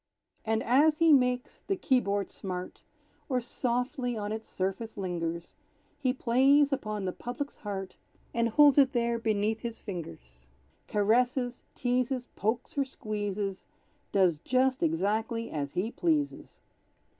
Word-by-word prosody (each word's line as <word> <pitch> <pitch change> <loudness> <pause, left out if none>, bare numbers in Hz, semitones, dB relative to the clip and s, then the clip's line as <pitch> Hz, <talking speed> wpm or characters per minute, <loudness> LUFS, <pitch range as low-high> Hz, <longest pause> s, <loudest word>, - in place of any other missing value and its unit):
And 220 0 0
as 300 +5 +4
he 330 -1 +6
makes 250 -2 +1
the 390 - +1
key 265 -8 +3
board 200 -3 -2
smart, 180 -1 -6 0.5
Or 255 -2 +2
softly 245 0 -2
on 205 0 -3
its 220 +1 -5
surface 195 +4 -3
lingers, 170 -3 -3 0.5
He 260 -3 +2
plays 275 +3 +4
upon 215 -6 -3
the 185 - 0
public's 245 +8 -6
heart, 195 -3 -5 0.4
And 235 0 +1
holds 290 +4 +6
it 270 0 +5
there 235 -1 +1
beneath 220 0 0
his 230 -1 -5
fingers; 65 - -9 0.4
Caresses, 245 +4 +1
teases, 250 0 0
pokes 225 +4 -2
or - - +4
squeezes, 205 -6 -4 0.4
Does 180 -6 +3
just 260 - +1
exactly 215 +8 0
as 145 -2 -3
he 205 +6 -1
pleases. 305 -3 -1
230 Hz, 135 wpm, -29 LUFS, 200-255 Hz, 0.5 s, he